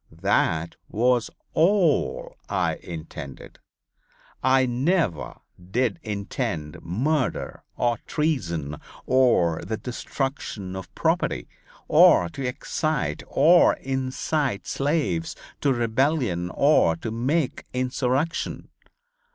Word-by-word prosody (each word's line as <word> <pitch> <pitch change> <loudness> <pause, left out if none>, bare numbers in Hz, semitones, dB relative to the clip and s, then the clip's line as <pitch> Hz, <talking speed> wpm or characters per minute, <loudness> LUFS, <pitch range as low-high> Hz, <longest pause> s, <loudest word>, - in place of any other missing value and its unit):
That 80 +1 +1
was 120 +1 +2 0.2
all 170 -3 +2
I - - 0
intended. 80 -4 -9 0.8
I 130 0 +4
never 125 - 0 0.2
did 120 - -1
intend 100 - -4
murder 130 - -1 0.2
or 120 -2 +1
treason, 85 - -1 0.3
or 120 -11 +3
the 110 - -3
destruction 125 -6 -4
of 95 -1 -7
property, - - 0 0.4
or 85 - +6
to 135 - -6
excite 150 +4 -2
or 175 +2 +5
incite 130 -2 -2
slaves 135 - -1 0.2
to 140 - +2
rebellion 120 - +1
or 140 - +4
to 110 +7 -5
make 130 +6 -1
insurrection. 130 +5 -1
125 Hz, 90 wpm, -25 LUFS, 90-140 Hz, 0.8 s, or